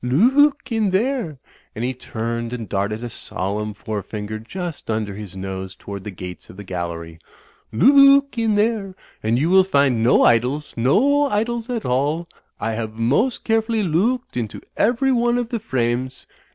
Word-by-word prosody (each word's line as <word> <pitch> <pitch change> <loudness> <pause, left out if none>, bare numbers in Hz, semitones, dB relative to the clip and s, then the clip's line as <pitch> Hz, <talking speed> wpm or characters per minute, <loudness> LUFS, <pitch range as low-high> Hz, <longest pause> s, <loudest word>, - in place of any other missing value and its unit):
Loo 240 - +5
ook 275 -3 -10
in 220 -3 +1
there," 200 - 0 0.4
and 115 - -4
he 130 - -1
turned 115 -1 -4
and 115 -3 -5
darted 105 +3 -2
a - - -3
solemn 105 +3 -4
forefinger 105 0 -5
just 170 +8 -6
imder 110 -3 -2
his 100 -2 -8
nose 95 0 -5
toward 100 -1 -8
the 105 - -6
gates 90 -2 -9
of 95 - -13
the 100 - -8
gallery; 85 -3 -5 0.5
"Loo 275 - +7
ook 280 -1 -4
in 225 -2 +1
there 205 -3 0 0.3
and 110 +2 +1
you 145 +5 +1
will 190 0 +7
find 140 -9 +2
no 120 +3 +4
Idols. 125 +6 +2
No 255 - +3
Idols 230 0 -1
at 235 -3 -3
all. 145 +7 0 0.3
I 115 - -2
have 110 -1 -4
most 130 - +1
carefully 225 -1 +1
loo 190 +9 +2
ooked 245 - -27
into 110 -3 -5
every 245 +5 +2
one 240 -1 +2
of 240 -2 -2
the 235 -2 -2
frames. 130 - -2
130 Hz, 175 wpm, -21 LUFS, -, 0.5 s, Loo